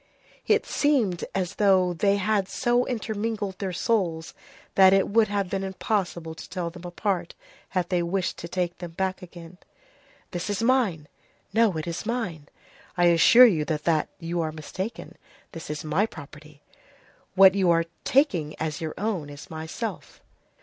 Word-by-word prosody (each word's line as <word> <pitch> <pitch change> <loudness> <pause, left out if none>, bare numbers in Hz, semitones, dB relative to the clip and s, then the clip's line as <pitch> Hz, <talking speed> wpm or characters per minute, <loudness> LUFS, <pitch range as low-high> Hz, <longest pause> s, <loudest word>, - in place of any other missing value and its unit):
It - - +3
seemed 245 - +1
as 190 -1 -1
though 190 -3 +3
they 200 +4 +2
had 200 -1 0
so 245 +3 +1
intermingled 215 -4 -3
their 195 -2 -2
souls, 175 -5 -1 0.4
that 190 0 +7
it 195 0 +3
would 220 +1 +4
have 200 -1 -1
been 195 +1 -3
impossible 185 -4 -2
to 160 - -11
tell 175 -3 -4
them 180 0 -11
apart 185 +2 -2 0.3
had 180 -3 -1
they 180 -2 +1
wished 180 +2 -2
to 170 - -6
take 175 0 -3
them 175 -2 -7
back 190 +2 -2
again.—"This 180 - -11
is 205 +2 -1
mine." 225 - +1 0.5
"No, 225 -6 +3
it 155 - -4
is 170 -1 -4
mine." 200 -11 -3 0.5
"I 175 - +4
assure 235 +9 +8
you 170 -10 +3
that 155 0 0
you 170 0 -2
are 160 -1 -2
mistaken. 185 +7 -7 0.3
This 165 -2 -9
is 150 0 -4
my 160 +8 +1
property." 150 -3 -13 0.7
"What 190 -1 +8
you 190 -3 +2
are 165 0 +3 0.2
taking 180 - +2
as 155 -1 -3
your 160 -1 -4
own 190 -7 -2
is 145 +2 -11
myself." 160 +8 -6
185 Hz, 155 wpm, -25 LUFS, 165-205 Hz, 0.7 s, assure